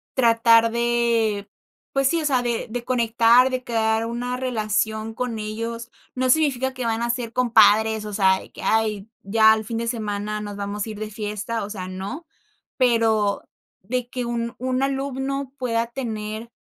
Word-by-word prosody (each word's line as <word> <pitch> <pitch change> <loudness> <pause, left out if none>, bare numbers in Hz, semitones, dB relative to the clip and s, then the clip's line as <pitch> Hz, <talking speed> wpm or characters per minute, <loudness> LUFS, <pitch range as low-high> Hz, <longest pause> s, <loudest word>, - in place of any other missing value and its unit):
tratar 230 -2 +5
de, 235 -3 +1 0.4
pues 275 -1 +2
sí, 335 +2 +1
o - - -3
sea, 265 -4 +2
de 240 -1 -2
de 240 +2 -4
conectar, 235 0 +4
de 255 -1 -3
crear 225 -1 0
una 240 +2 -3
relación 220 -3 -1
con 235 -1 -3
ellos, 230 +2 -5 0.2
no 255 0 0
significa 265 -3 +2
que 255 -2 -4
van 225 0 0
a 235 - -1
ser 235 -1 -2
compadres, 220 -2 +4
o 210 - -6
sea, 190 -2 +3
de - - -15
que: - - -11
"Ay, 215 -2 0
ya 220 +2 +5
al 220 0 -2
fin 225 +1 -4
de 230 0 -2
semana 210 -2 -3
nos 205 -1 -6
vamos 200 0 -3
a - - -7
ir 210 -1 -7
de 215 0 -4
fiesta", 210 +1 -4
o 200 - -6
sea, 190 -3 -6
no, 195 - -6 0.5
pero 225 -5 +2 0.3
de 245 +5 -3
que 250 -1 -4
un 235 0 -3
un 255 +1 -1
alumno 275 0 -2
pueda 235 -3 -1
tener. 225 -3 -5
230 Hz, 175 wpm, -23 LUFS, 215-250 Hz, 0.5 s, tratar